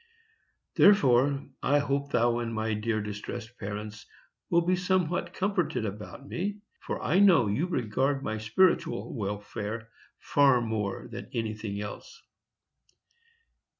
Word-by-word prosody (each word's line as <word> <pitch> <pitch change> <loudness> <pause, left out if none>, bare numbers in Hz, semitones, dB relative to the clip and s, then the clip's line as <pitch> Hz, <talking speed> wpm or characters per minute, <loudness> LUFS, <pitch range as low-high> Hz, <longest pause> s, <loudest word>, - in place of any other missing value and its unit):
Therefore 140 -8 +5 0.2
I 145 - +3
hope 140 0 -1
thou 120 0 +2
and 115 -1 -3
my 110 0 -1
dear 110 +1 -1
distressed 105 +3 -6
parents 105 +1 -6 0.4
will 170 0 +4
be 185 +1 +3
somewhat 180 -1 0
comforted 175 - 0
about 105 +7 -7
me, 200 +4 -3 0.2
for - - -4
I 180 +6 +3
know 180 - +6
you 105 - 0
regard 135 - 0
my 110 0 -2
spiritual 110 - +1
welfare 105 +1 -4 0.3
far 140 -3 +4
more 110 -4 -3
than - - -8
anything 110 -2 -3
else. 105 - -8
120 Hz, 120 wpm, -28 LUFS, 110-155 Hz, 0.4 s, know